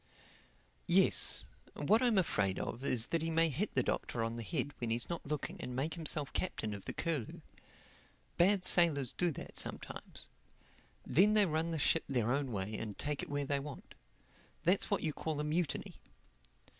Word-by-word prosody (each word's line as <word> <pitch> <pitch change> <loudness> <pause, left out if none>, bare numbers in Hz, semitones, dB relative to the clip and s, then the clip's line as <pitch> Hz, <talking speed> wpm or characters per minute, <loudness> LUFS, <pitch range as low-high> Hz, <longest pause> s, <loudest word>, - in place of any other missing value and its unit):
"Yes. - - +5 0.3
What 210 - +3
I'm 240 -4 +3
afraid 100 - +1
of 120 - -4
is 120 -4 +2
that 165 - +2
he 165 - -1
may 165 0 +3
hit 170 +9 -2
the 130 - +3
Doctor 115 -1 -2
on 115 0 -2
the 120 - -5
head 145 +4 -2
when 120 - -2
he's 115 +2 -1
not 170 - -4
looking 150 -1 -4
and 125 - -5
make 145 +5 -1
himself 155 -3 -3
captain 110 - -2
of 100 -1 -8
the - - -4
Curlew. 155 -9 -3 0.9
Bad 185 +1 +3
sailors 145 -8 +4
do 175 - +1
that - - -9
sometimes. - - -5 0.8
Then 200 +10 +4
they 210 -1 +6
run 160 0 -1
the 165 - -2
ship 155 +2 +3
their 120 -4 +1
own 135 -1 0
way 105 0 -3
and 105 -2 -5
take 145 -1 -2
it - - -6
where 145 0 -1
they 140 0 0
want. 140 0 -9 0.7
That's 180 +4 +2
what 200 - 0
you 155 -2 -1
call 155 0 -3
a - - 0
mutiny." 155 +1 -2
150 Hz, 180 wpm, -34 LUFS, 125-170 Hz, 0.9 s, they